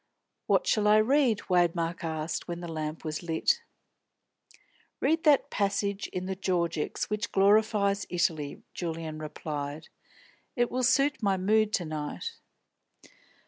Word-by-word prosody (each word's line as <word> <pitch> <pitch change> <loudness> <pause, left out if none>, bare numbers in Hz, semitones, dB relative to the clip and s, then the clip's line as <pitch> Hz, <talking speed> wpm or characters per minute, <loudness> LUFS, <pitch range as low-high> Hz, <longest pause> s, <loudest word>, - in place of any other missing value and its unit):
"What - - +3
shall 215 - +2
I 210 +1 +6
read?" 240 0 +3
Waymark 175 -1 +1
asked, 160 0 -3
when 175 -1 -4
the 175 - -6
lamp 155 0 -5
was 155 -1 -3
lit. 175 - +1 1.4
"Read 320 +1 +1
that 295 -3 +4
passage 200 0 -1
in 185 0 -5
the 190 0 -3
Georgics 175 -2 -1
which 210 +2 -2
glorifies 200 0 +3
Italy," 165 -5 -1
Julian 160 -2 -4
replied. 150 0 -5 0.7
"It 240 -2 +1
will 255 - -1
suit 275 +1 +3
my 200 -3 +2
mood 215 +3 +2
to 175 - +1
night." 155 - -4
185 Hz, 130 wpm, -28 LUFS, 160-215 Hz, 1.4 s, I